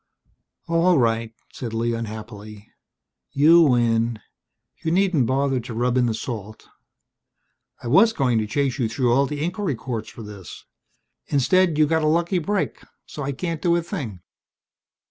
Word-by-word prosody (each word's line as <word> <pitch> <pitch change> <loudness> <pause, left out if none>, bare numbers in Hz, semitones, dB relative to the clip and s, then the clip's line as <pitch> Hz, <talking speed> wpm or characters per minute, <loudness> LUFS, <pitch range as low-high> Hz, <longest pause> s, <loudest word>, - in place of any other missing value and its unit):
"All 170 +1 +3
right," 115 -2 +1 0.2
said 115 -3 -6
Lee 115 +1 0
unhappily, 110 -2 -8 0.6
"you 160 +5 +6
win. 120 -5 +2 0.6
You 160 - 0
needn't 175 -7 +2
bother 135 0 +1
to 120 -1 -7
rub 120 +1 0
in 125 -1 +3
the 115 - -1
salt. 110 -3 -7 1.2
I - - -5
was 195 - +5
going 130 - +1
to 110 - -2
chase 140 +4 -1
you 115 -3 0
through 120 +1 +1
all 135 +2 +3
the 150 +1 -4
inquiry 180 -3 -2
courts 115 -2 -5
for 115 - -10
this. 105 -4 -11 0.6
Instead, 165 +4 +2
you 155 - +5
got 160 +1 +1
a 155 - +1
lucky 170 +3 +1
break, 200 +4 -2 0.2
so 150 - -8
I 140 0 -2
can't 165 +2 -4
do 170 +1 +2
a 170 - 0
thing. 135 - -6
130 Hz, 160 wpm, -23 LUFS, 115-165 Hz, 1.2 s, you